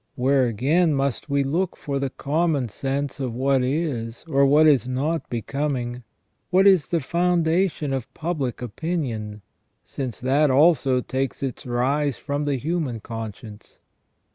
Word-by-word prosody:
Where, 130 Hz, 0 st, +3 dB
again, 150 Hz, -, +2 dB
must 135 Hz, +2 st, -2 dB
we 140 Hz, 0 st, +2 dB
look 165 Hz, +7 st, -1 dB
for 140 Hz, -1 st, -3 dB
the 135 Hz, -1 st, -1 dB
common 145 Hz, -2 st, 0 dB
sense 135 Hz, +5 st, -3 dB
of 125 Hz, -4 st, -3 dB
what 135 Hz, +1 st, +2 dB
is, 130 Hz, -5 st, -2 dB
or 140 Hz, +1 st, +4 dB
is 135 Hz, -6 st, +4 dB
not, 145 Hz, +6 st, -2 dB
becoming, 125 Hz, 0 st, -3 dB, 0.5 s
which 185 Hz, +2 st, +4 dB
is 185 Hz, -8 st, +5 dB
the 170 Hz, -, 0 dB
foundation 170 Hz, -1 st, +1 dB
of 130 Hz, -3 st, -4 dB
public 150 Hz, -8 st, -3 dB
opinion, 115 Hz, -, -4 dB, 0.4 s
since 130 Hz, -4 st, -5 dB
that 140 Hz, +4 st, +2 dB
also 135 Hz, -2 st, +4 dB
takes 130 Hz, +2 st, -3 dB
its 130 Hz, -1 st, -4 dB
rise 135 Hz, +3 st, 0 dB
from 145 Hz, 0 st, -3 dB
the 145 Hz, -1 st, 0 dB
human 145 Hz, -3 st, -2 dB
conscience? 110 Hz, -1 st, -8 dB
140 Hz, 140 wpm, -23 LUFS, 125-155 Hz, 0.5 s, is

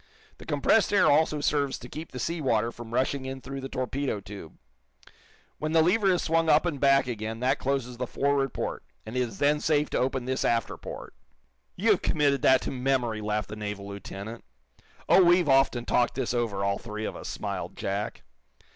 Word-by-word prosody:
The -, -, -12 dB
compressed 150 Hz, +9 st, +3 dB
air 205 Hz, -, +4 dB
also 150 Hz, 0 st, +2 dB
serves 145 Hz, -2 st, 0 dB
to 125 Hz, -, -10 dB
keep 155 Hz, +5 st, -8 dB
the -, -, -7 dB
sea 165 Hz, +5 st, -2 dB
water 115 Hz, -4 st, +1 dB
from 115 Hz, -1 st, -10 dB
rushing 130 Hz, +2 st, 0 dB
in 130 Hz, 0 st, -5 dB
through 135 Hz, +1 st, -7 dB
the 135 Hz, -, -6 dB
torpedo 130 Hz, -2 st, -2 dB
tube. 100 Hz, -4 st, -10 dB, 1.0 s
When 155 Hz, +1 st, -2 dB
the 160 Hz, -1 st, +5 dB
lever 195 Hz, +4 st, +3 dB
is 180 Hz, -, +1 dB
swung 165 Hz, 0 st, +2 dB
up 155 Hz, +2 st, +5 dB
and 160 Hz, -5 st, -2 dB
back 140 Hz, 0 st, +4 dB
again 110 Hz, -2 st, -4 dB
that 130 Hz, +3 st, +1 dB
closes 130 Hz, -3 st, -2 dB
the 125 Hz, 0 st, -3 dB
forward 140 Hz, 0 st, 0 dB
port, -, -, -4 dB, 0.2 s
and 110 Hz, +3 st, -7 dB
it -, -, +1 dB
is 115 Hz, -5 st, -2 dB
then 145 Hz, +1 st, +2 dB
safe 150 Hz, -1 st, +1 dB
to -, -, 0 dB
open 130 Hz, -1 st, -1 dB
this 130 Hz, +1 st, -1 dB
after 115 Hz, -1 st, 0 dB
port." -, -, -9 dB, 0.6 s
"You've 210 Hz, 0 st, +2 dB
committed 140 Hz, -4 st, +1 dB
that 130 Hz, -1 st, +5 dB
to -, -, -3 dB
memory," 125 Hz, -4 st, 0 dB
laughed 105 Hz, -1 st, -2 dB
the 105 Hz, -, -6 dB
naval 105 Hz, -1 st, -5 dB
lieutenant. 100 Hz, +3 st, -8 dB, 0.6 s
"Oh, 180 Hz, +3 st, +6 dB
we've 175 Hz, -1 st, +4 dB
often 135 Hz, -3 st, +3 dB
talked 120 Hz, -, +1 dB
this 130 Hz, -2 st, -1 dB
over, 115 Hz, -5 st, -1 dB
all 100 Hz, 0 st, 0 dB
three 110 Hz, -1 st, -6 dB
of -, -, -4 dB
us," -, -, -8 dB
smiled -, -, -5 dB
Jack. 100 Hz, +2 st, -3 dB
130 Hz, 200 wpm, -27 LUFS, 115-145 Hz, 1.0 s, Oh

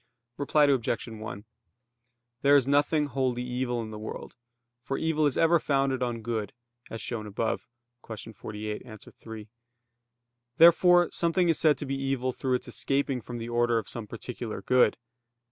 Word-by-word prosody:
Reply 150 Hz, +1 st, +2 dB
Obj. 130 Hz, -5 st, 0 dB
1: 110 Hz, -2 st, -8 dB, 1.0 s
There 140 Hz, +1 st, +5 dB
is 140 Hz, -3 st, +5 dB
nothing 145 Hz, +2 st, +2 dB
wholly 130 Hz, -3 st, -1 dB
evil 125 Hz, -1 st, -2 dB
in 110 Hz, -, -8 dB
the 105 Hz, -, -7 dB
world, 110 Hz, -, -7 dB, 0.5 s
for 135 Hz, +2 st, -3 dB
evil 155 Hz, -2 st, +1 dB
is 140 Hz, -, -1 dB
ever 165 Hz, +1 st, +4 dB
founded 135 Hz, -3 st, 0 dB
on 120 Hz, -2 st, -2 dB
good, 110 Hz, -3 st, -3 dB, 0.4 s
as 115 Hz, -, -6 dB
shown 110 Hz, -3 st, -4 dB
above 110 Hz, +2 st, -2 dB, 0.4 s
(Q. 110 Hz, 0 st, -8 dB
48, 105 Hz, 0 st, -6 dB
A. 110 Hz, -4 st, -10 dB
3). 110 Hz, +1 st, -11 dB, 1.1 s
Therefore 175 Hz, +1 st, +6 dB
something 170 Hz, +1 st, +1 dB
is 165 Hz, -, +2 dB
said 150 Hz, -3 st, +4 dB
to 145 Hz, -, -5 dB
be 135 Hz, 0 st, -3 dB
evil 130 Hz, -2 st, -1 dB
through 130 Hz, 0 st, 0 dB
its 125 Hz, -, -4 dB
escaping 135 Hz, -2 st, -1 dB
from 120 Hz, +1 st, -7 dB
the 115 Hz, 0 st, -5 dB
order 120 Hz, 0 st, +2 dB
of 110 Hz, -, -3 dB
some 115 Hz, -3 st, -5 dB
particular 115 Hz, -2 st, -6 dB
good. 125 Hz, +3 st, +4 dB
125 Hz, 160 wpm, -28 LUFS, 115-140 Hz, 1.1 s, Therefore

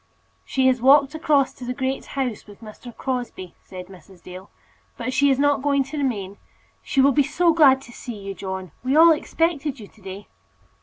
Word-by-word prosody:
"She 265 Hz, -1 st, -1 dB
has 255 Hz, -2 st, +3 dB
walked 275 Hz, +2 st, +5 dB
across 305 Hz, -4 st, +1 dB
to -, -, -12 dB
the 250 Hz, +1 st, -4 dB
Great 265 Hz, +1 st, -2 dB
House 250 Hz, -7 st, -3 dB
with 205 Hz, +1 st, -15 dB
Mr. 225 Hz, +2 st, -11 dB
Crosbie," 245 Hz, -8 st, -5 dB
said 185 Hz, -1 st, -9 dB
Mrs. 185 Hz, -1 st, -17 dB
Dale; 185 Hz, +2 st, -11 dB, 0.5 s
"but 250 Hz, +2 st, -4 dB
she 285 Hz, +1 st, +3 dB
is 265 Hz, -, +2 dB
not 285 Hz, -1 st, +2 dB
going 280 Hz, -1 st, +1 dB
to 275 Hz, +3 st, -8 dB
remain. 205 Hz, -8 st, -3 dB, 0.4 s
She 270 Hz, -, +1 dB
will 275 Hz, +1 st, +5 dB
be 290 Hz, -, +3 dB
so 330 Hz, +4 st, +2 dB
glad 270 Hz, -4 st, +5 dB
to 240 Hz, -, -14 dB
see 240 Hz, -1 st, -8 dB
you, 195 Hz, -1 st, -7 dB
John! 190 Hz, -2 st, -6 dB
We 260 Hz, +2 st, 0 dB
all 330 Hz, +2 st, +8 dB
expected 310 Hz, -3 st, -1 dB
you 210 Hz, -, -10 dB
to 215 Hz, -, -23 dB
day." 195 Hz, +1 st, -9 dB
260 Hz, 200 wpm, -22 LUFS, 205-280 Hz, 0.5 s, all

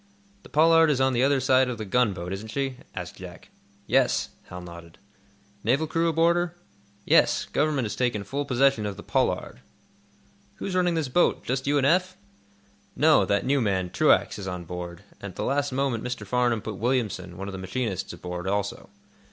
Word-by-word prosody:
"The -, -, -15 dB
'Pollard' 165 Hz, +1 st, +5 dB
is 140 Hz, -3 st, +1 dB
on 130 Hz, 0 st, +3 dB
the 120 Hz, -, +1 dB
other 140 Hz, +1 st, +3 dB
side 130 Hz, 0 st, +3 dB
of 120 Hz, -, -4 dB
the 110 Hz, -, -5 dB
gunboat, 95 Hz, -5 st, 0 dB
isn't 100 Hz, +3 st, -6 dB
she?" 135 Hz, +2 st, -3 dB, 0.2 s
asked -, -, -6 dB
Jack. -, -, -11 dB, 0.4 s
"Yes," -, -, +2 dB, 0.2 s
Hal 90 Hz, -, -8 dB
nodded. 85 Hz, -1 st, -11 dB, 0.7 s
"Naval 130 Hz, +8 st, +2 dB
crew 165 Hz, +1 st, 0 dB
aboard 165 Hz, +2 st, +3 dB
her?" 175 Hz, -1 st, -2 dB, 0.5 s
"Yes; -, -, +4 dB
Government 145 Hz, -4 st, 0 dB
has 105 Hz, -, -4 dB
taken 120 Hz, -5 st, 0 dB
full 140 Hz, +8 st, -3 dB
possession 135 Hz, -4 st, +2 dB
of 100 Hz, -1 st, -5 dB
the 100 Hz, -, -9 dB
'Pollard.'" -, -, -1 dB, 1.0 s
"Who's 190 Hz, -, -5 dB
running 180 Hz, -2 st, +2 dB
this 160 Hz, -4 st, -1 dB
boat? 150 Hz, +8 st, +2 dB
Just 130 Hz, +2 st, -2 dB
you 145 Hz, +1 st, +3 dB
and 135 Hz, -, +2 dB
Eph?" 185 Hz, +5 st, +2 dB, 0.8 s
"No; 150 Hz, -9 st, +5 dB
that 100 Hz, +4 st, 0 dB
new 140 Hz, +1 st, +2 dB
man, 95 Hz, -5 st, 0 dB
Truax, -, -, +3 dB
is 95 Hz, -, -6 dB
on 90 Hz, -1 st, -4 dB
board, 90 Hz, +1 st, -7 dB, 0.2 s
and 100 Hz, -2 st, -7 dB
at -, -, -27 dB
the -, -, -3 dB
last 140 Hz, +1 st, 0 dB
moment 130 Hz, -3 st, -1 dB
Mr. 125 Hz, -4 st, -4 dB
Farnum 120 Hz, 0 st, +1 dB
put 110 Hz, -3 st, -5 dB
Williamson, 105 Hz, -7 st, -1 dB
one 95 Hz, +1 st, -5 dB
of -, -, -5 dB
the 95 Hz, -, -7 dB
machinists, 95 Hz, 0 st, -3 dB
aboard, 90 Hz, +1 st, -6 dB
also. 100 Hz, +1 st, -2 dB
125 Hz, 190 wpm, -26 LUFS, 95-140 Hz, 1.0 s, Pollard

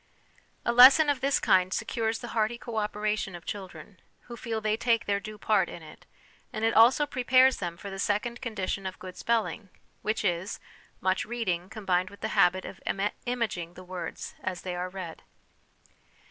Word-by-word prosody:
A -, -, +3 dB
lesson 270 Hz, +5 st, +8 dB
of 275 Hz, -, -3 dB
this 275 Hz, 0 st, +2 dB
kind 185 Hz, 0 st, +3 dB
secures 225 Hz, +2 st, -1 dB
the 240 Hz, -, -8 dB
hearty 220 Hz, +1 st, 0 dB
co 235 Hz, -2 st, -7 dB
operation 210 Hz, -2 st, -1 dB
of 170 Hz, -2 st, -11 dB
children, 185 Hz, -2 st, -8 dB, 0.2 s
who 240 Hz, -, -10 dB
feel 225 Hz, -1 st, -3 dB
they 215 Hz, 0 st, 0 dB
take 230 Hz, 0 st, +1 dB
their 200 Hz, 0 st, +1 dB
due 215 Hz, +1 st, -9 dB
part 210 Hz, -1 st, +2 dB
in 170 Hz, -, -9 dB
it; 155 Hz, -, -14 dB, 0.4 s
and 215 Hz, +1 st, -2 dB
it 225 Hz, -, +2 dB
also 245 Hz, +6 st, +6 dB
prepares 255 Hz, -1 st, +4 dB
them 175 Hz, -2 st, -4 dB
for 200 Hz, +2 st, -8 dB
the 195 Hz, -, -7 dB
second 225 Hz, +5 st, -1 dB
condition 195 Hz, -4 st, -3 dB
of 185 Hz, -, -6 dB
good 185 Hz, -1 st, -9 dB
spelling, 225 Hz, -3 st, -1 dB, 0.3 s
which 215 Hz, 0 st, -1 dB
is 175 Hz, +1 st, -1 dB, 0.4 s
much 185 Hz, 0 st, +1 dB
reading 190 Hz, -7 st, -2 dB
combined 185 Hz, -4 st, 0 dB
with 200 Hz, -, -15 dB
the -, -, -2 dB
habit 185 Hz, -2 st, +3 dB
of -, -, -9 dB, 0.5 s
imaging 210 Hz, -9 st, -2 dB
the 185 Hz, -, -10 dB
words 180 Hz, -2 st, -6 dB
as 185 Hz, -1 st, -4 dB
they 180 Hz, -1 st, -4 dB
are 180 Hz, +1 st, -3 dB
read. 180 Hz, -3 st, -7 dB
210 Hz, 180 wpm, -28 LUFS, 185-235 Hz, 0.5 s, lesson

